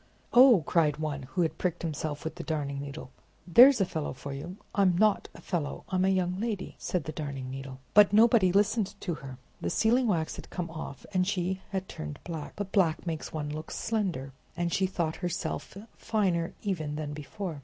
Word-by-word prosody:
"Oh!" 245 - +8
cried 150 -4 +2
one, 145 -4 -3
who 180 - +3
had 160 - -2
pricked 175 -2 -1
himself 155 -2 -3
with 160 - -3
the 170 +1 -7
Darning 140 -3 -2
Needle, 140 -2 -7 0.3
there's 245 +9 +8
a 195 - +3
fellow 160 -4 -3
for 140 +1 -7
you!" 170 +8 -7 0.2
"I'm 190 -3 +3
not 210 0 +3
a - - -11
fellow; 165 -6 -3
I'm 185 0 +2
a - - +3
young 185 -1 +1
lady!" 210 -4 -3
said 180 -4 -1
the 155 - -5
Darning 140 -5 -5
Needle. 135 -1 -7
But 205 -1 +7
nobody 220 -3 +5
listened 205 +1 +2
to 175 - -2
her. 135 -4 -8 0.2
The - - -1
sealing 235 +7 +3
wax 165 -6 0
had - - -9
come 170 -3 -4
off, 160 -4 -7
and 185 -1 +2
she 190 -1 -1
had 190 -1 -3
turned 75 -1 -6
black; 160 -4 -6
but 205 -2 -5
black 175 -6 +2
makes 160 -3 -4
one 150 -2 -3
look 155 +1 -6
slender, 185 - -2 0.2
and 175 -1 -1
she 190 - +2
thought 170 -4 -2
herself 180 +1 -4 0.2
finer 185 -7 0
even 160 -8 -2
than 150 -1 -4
before. 155 +2 -6
175 Hz, 195 wpm, -29 LUFS, 150-195 Hz, 0.3 s, Oh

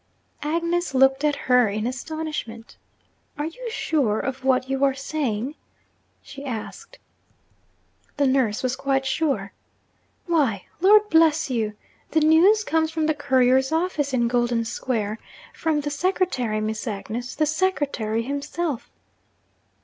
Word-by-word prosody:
Agnes 335 0 -1
looked 270 +1 +4
at 295 -1 +2
her 250 -4 +3
in 210 +2 -3
astonishment. 255 -3 -5 0.6
'Are 295 - -2
you 465 +10 -6
sure 275 - 0
of 265 0 -4
what 260 -1 +2
you 270 +1 -1
are 270 -1 +3
saying?' 270 -3 -2 0.7
she 275 - -10
asked. 235 -6 -7 1.2
The 285 - +3
nurse 260 -5 +1
was 255 0 0
quite 270 -1 0
sure. 265 -8 -1 0.7
'Why, 280 - +1
Lord 415 +4 +6
bless 320 -3 +4
you! 220 -3 -1 0.4
the 320 - +2
news 345 +8 +5
comes 320 -4 +1
from 320 -1 -1
the 310 - +2
couriers' 265 -2 +2
office 320 -4 0
in 240 -2 +1
Golden 240 -1 +1
Square 225 -2 -2 0.3
from 315 -2 0
the 290 0 -3
secretary, 285 - 0
Miss 215 +2 -3
Agnes, 225 +4 -5
the 310 - +2
secretary 290 - 0
himself!' 285 +1 -3
275 Hz, 130 wpm, -24 LUFS, 240-315 Hz, 1.2 s, Lord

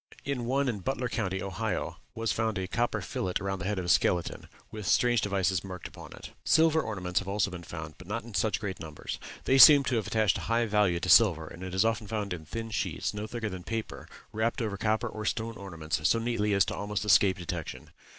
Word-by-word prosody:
In 135 -4 -2
one 135 +3 +1
in 115 -5 -1
Butler 125 +5 -2
County, 95 -5 -2
Ohio, 95 -4 -3 0.2
was 115 0 -1
found 110 -2 -1
a 95 -1 -2
copper 115 0 -1
fillet 90 0 -3
around 95 -1 -3
the 95 - -5
head 105 +1 -1
of 90 - -2
a - - -5
skeleton, 90 0 +1 0.2
with 105 -2 -6
strange 120 -2 +3
devices 95 -3 0
marked 95 -2 -7
upon - - -12
it. - - -10
Silver 160 0 +4
ornaments 90 - -2
have 95 - -8
also 100 0 0
been 90 -1 -7
found, 80 -2 -8
but 90 - -12
not 110 +4 -3
in 115 -1 -11
such 100 +4 +1
great 100 -4 -5
numbers. 80 -2 -6 0.2
They 135 +1 +3
seem 145 0 +10
to 125 -2 0
have 110 - -2
attached 110 -2 +2
a - - -7
high 115 +1 +2
value 105 -5 +2
to 90 - -4
silver, 90 -6 +6
and 80 +3 -11
it 95 0 -5
is 95 - +3
often 110 -2 0
found 105 -3 -3
in 80 -3 -7
thin 115 +5 -5
sheets, - - -2
no 105 +1 -4
thicker 115 -1 -4
than 95 -3 -6
paper, 110 +2 -5 0.3
wrapped 110 +4 0
over 110 -4 -2
copper 110 +3 0
or 110 -1 -6
stone 115 +1 -2
ornaments 80 -7 -4
so - - +3
neatly 115 -3 0
as 100 - +4
almost 105 0 -3
to - - -6
escape 95 -2 +5
detection. 85 -2 -6
105 Hz, 230 wpm, -29 LUFS, 95-115 Hz, 0.3 s, seem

